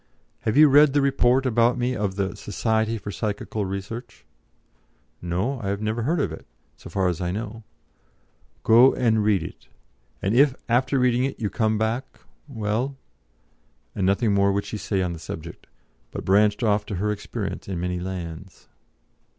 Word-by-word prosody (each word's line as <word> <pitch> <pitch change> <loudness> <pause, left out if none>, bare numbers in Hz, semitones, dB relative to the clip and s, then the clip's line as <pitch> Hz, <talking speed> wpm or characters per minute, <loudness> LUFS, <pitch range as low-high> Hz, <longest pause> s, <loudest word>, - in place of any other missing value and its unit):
"Have 110 +4 -1
you 155 0 +9
read 145 0 +6
the 145 - +3
report 130 -1 +3
about 120 0 +3
me 125 +1 0
of 100 -4 -2
the 100 -1 -2
Society 110 +2 -1
for 105 -1 -6
Psychical 105 0 -3
Research?" 100 +5 -7 1.0
"No; 95 +10 -2
I 100 -1 -1
never 110 +3 -2
heard 155 +8 0
of - - 0
it, - - -10 0.3
so - - -12
far 95 -2 0
as 90 0 -2
I 90 - -1
know." 110 +4 -5 1.0
"Go 120 +4 +6
and 110 -4 +2
read 100 -5 +2
it, - - -10 0.5
and 100 - -1
if, 135 0 +5
after 130 +3 +2
reading 125 -1 +2
it, 135 - -3
you 105 -4 -2
come 110 -2 +1
back 110 +4 -2 0.3
well." 120 +2 -2 1.0
And 95 - 0
nothing 100 +2 +2
more 100 0 +3
would 100 +1 -1
she 110 - -5
say 95 -1 -1
on 90 -1 -2
the 85 - -8
subject, 80 +1 -8 0.4
but - - -7
branched 105 +3 +3
off 105 -2 +2
to 100 - -4
her 105 +4 0
experiences 105 -1 -5
in 90 - -3
many 90 0 -2
lands. 90 -1 -7
105 Hz, 170 wpm, -24 LUFS, 95-120 Hz, 1.0 s, you